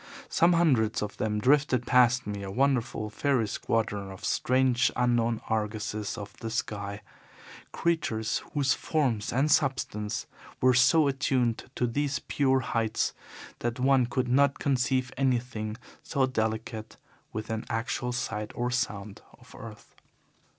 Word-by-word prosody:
Some 170 +1 +4
hundreds 130 -12 +2
of 105 - -6
them 105 -1 -1
drifted 130 0 +3
past 125 0 +4
me, 105 -1 -4
a 100 - -5
wonderful 120 -2 0
fairy 125 -1 +1
squadron 105 -2 -2
of 95 -1 -8
strange 130 -1 +2
unknown 120 -2 +1
argosies 110 -1 -2
of 105 -1 -8
the 115 - -5
sky 100 -2 -4 0.7
creatures 135 -10 0
whose 140 -2 +3
forms 125 -10 -1
and 140 +5 +2
substance 110 -7 0 0.3
were 130 0 +5
so 145 +5 +5
attuned 130 -4 0
to 125 - +1
these 140 +3 -1
pure 135 -2 +1
heights 115 -3 -1 0.5
that 120 +1 -2
one 130 -1 +4
could 125 +1 -1
not 140 +3 +3
conceive 130 -1 0
anything 120 -5 -1 0.2
so 140 -4 +1
delicate 110 -2 -3 0.3
within 110 +1 -4
actual 115 +2 -2
sight 105 -3 -3
or 125 +1 -1
sound 105 -4 -3 0.2
of 125 -1 -17
earth. 115 -4 -11
120 Hz, 130 wpm, -28 LUFS, 110-130 Hz, 0.7 s, were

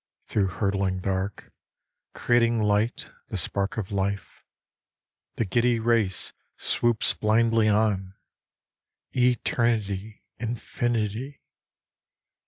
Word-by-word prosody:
Through 100 -3 +1
hurtling 100 0 0
dark, 95 +1 -3 0.6
Creating 120 -1 +3
light, 105 +2 0 0.2
the - - -4
spark 100 +1 -2
of 105 -3 -3
life, 100 0 -3 0.9
The 115 - 0
giddy 120 +4 +2
race 110 -4 +1 0.2
swoops 120 -1 +2
blindly 115 +1 +3
on: 100 -3 +1 1.0
Eternity! 110 -4 0 0.2
Infinity 120 +2 -2
110 Hz, 80 wpm, -26 LUFS, 100-115 Hz, 1.0 s, Creating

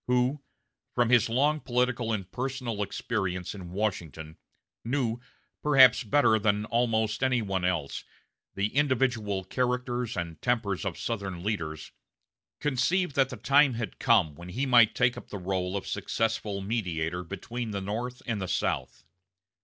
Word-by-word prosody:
who, 125 +3 +1 0.5
from 120 -2 +3
his 120 -3 +4
long 145 +6 +2
political 125 -3 0
and 95 -4 -3
personal 125 -4 -3
experience 95 -4 -2
in 95 -4 -8
Washington, 85 -6 -3 0.5
knew, 120 -2 -1 0.4
perhaps 135 -3 +6
better 115 -1 +3
than 105 0 +1
almost 115 -1 0
any 130 -2 +3
one 95 -4 -2
else, 90 -6 -1 0.5
the 100 +4 -1
individual 125 -8 +1
characters 125 +1 -1
and 85 -2 -4
tempers 110 -6 0
of 95 -4 -3
Southern 95 -6 -4
leaders, 80 -7 -3 0.7
conceived 150 +5 +1
that 135 -2 +3
the 125 - -7
time 140 -2 +4
had 115 -4 -5
come 75 - +3
when 85 +4 -10
he 125 +10 -1
might 120 -4 +6
take 125 -1 +3
up - - -9
the 100 - -5
rôle 95 0 -2
of 100 - -6
successful 105 -3 -2
mediator 90 -5 -2
between 115 +5 -5
the 100 -2 -3
North 115 +6 -4
and 110 -4 -2
the 95 - -3
South. - - -2
115 Hz, 145 wpm, -28 LUFS, 95-125 Hz, 0.7 s, perhaps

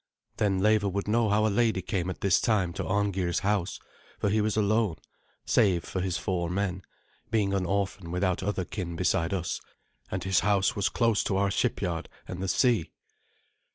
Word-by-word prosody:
Then 95 -3 +1
Leva 105 -1 +3
would 100 +2 -3
know 110 +1 +2
how 105 +1 +3
a - - +3
lady 110 -3 +1
came 90 -1 -2
at 95 - -6
this 95 -3 +3
time 100 -6 +1
to 95 - -3
Arngeir's 95 -3 0
house, 100 -3 0 0.4
for 100 - 0
he 110 +1 +2
was 110 0 0
alone, 105 -3 +2 0.5
save 90 -5 +3
for 95 - -3
his 90 -1 -1
four 85 -3 -2
men, 95 0 -1 0.5
being 105 -4 +1
an 95 -2 0
orphan 95 -2 -2
without 90 +1 0
other 95 -1 -1
kin 85 -3 -5
beside 85 -1 +1
us, 90 -4 -2 0.5
and 95 -1 -3
his 95 -2 +3
house 100 +1 +2
was 100 - +1
close 115 -3 +2
to 95 - 0
our 100 0 +2
shipyard 85 -3 -1 0.2
and 90 - -6
the 95 - -2
sea. 115 - +2
95 Hz, 185 wpm, -28 LUFS, 90-105 Hz, 0.5 s, Leva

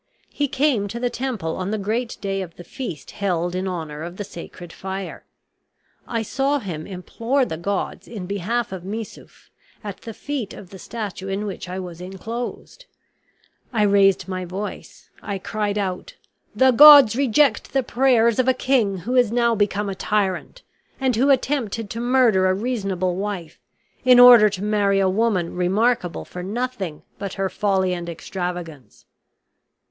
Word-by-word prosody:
He 290 - -1
came 265 -7 +1
to 235 +4 -6
the 245 0 -1
temple 230 -11 -3
on 185 +1 -3
the 215 - -1
great 225 +4 -2
day 195 -1 -2
of 170 -3 -8
the 175 - -11
feast 170 - -7
held 175 -3 -1
in 185 +1 -2
honor 160 -5 -5
of 175 +2 -7
the 205 - -3
sacred 175 -2 -10
fire. 190 0 -6 0.8
I 230 -1 -2
saw 270 +6 0
him 170 - -6
implore 230 +8 -1
the 160 - -4
gods 190 +4 -3
in 210 -5 -7
behalf 205 +5 -2
of 185 -2 -6
Missouf, 215 +3 -8 0.3
at 205 -3 -6
the 225 -2 -8
feet 275 -8 -4
of 185 - -12
the 190 - -10
statue 205 -4 -6
in 195 +2 -2
which 195 -2 -6
I 185 - -4
was 180 -2 -7
inclosed. 225 - -7 0.9
I 220 -4 +1
raised 200 -2 +4
my 185 -1 -3
voice, 190 +4 -7
I 200 - -4
cried 210 +1 -2
out, 185 -3 -3 0.4
'The 260 0 +5
gods 280 -3 +9
reject 270 -1 +2
the 270 -1 +1
prayers 235 -2 +3
of 255 - +2
a 260 - +4
king 240 -7 +1
who 250 +2 -1
is 245 -4 +4
now 235 0 +2
become 205 -1 0
a 195 - -2
tyrant, 195 - -2 0.4
and 260 -3 +1
who 265 +5 +2
attempted 240 -6 0
to 230 - -4
murder 240 -6 +3
a 185 - +2
reasonable 195 -5 -2
wife, 195 -5 -5 0.4
in 250 -1 +7
order 240 -4 +9
to 195 -1 -5
marry 205 -2 +2
a 195 - +3
woman 190 -3 0
remarkable 185 +1 0
for 180 - -8
nothing 200 -5 -4 0.2
but 200 -2 -4
her 195 0 -1
folly 190 -3 0
and 170 -1 -5
extravagance.' 170 - -6
205 Hz, 165 wpm, -22 LUFS, 185-240 Hz, 0.9 s, gods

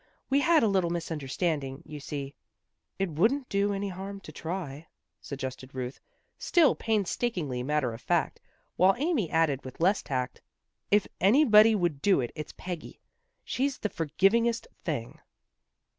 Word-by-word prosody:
We 275 - +5
had 330 0 +4
a - - +4
little 190 -4 +2
misunderstanding, 155 -3 -2
you 150 -1 -8
see." 140 -1 -5 0.3
" - - -54
It 195 -3 -1
wouldn't 235 - +1
do 200 +1 +1
any 200 0 -2
harm 195 +2 -6
to - - -10
try," 165 -3 -5 0.3
suggested 130 -1 -6
Ruth, 125 0 -4 0.4
still 335 -4 +4
painstakingly 200 - -1
matter 135 -2 0
of 115 - -9
fact, - - 0 0.4
while 190 +2 +5
Amy 280 - 0
added 160 -4 +1
with 130 - -10
less 190 +5 +3
tact, 130 -2 -3 0.5
"If 205 0 +4
anybody 220 0 +6
would 170 -8 0
do 195 -2 +4
it, 120 -2 -2
it's 155 -2 -7
Peggy. 180 -3 -7 0.4
She's 275 +1 -1
the 210 - -2
forgivingest 195 +10 +1 0.2
thing." 140 -9 -4
175 Hz, 145 wpm, -28 LUFS, 140-210 Hz, 0.5 s, anybody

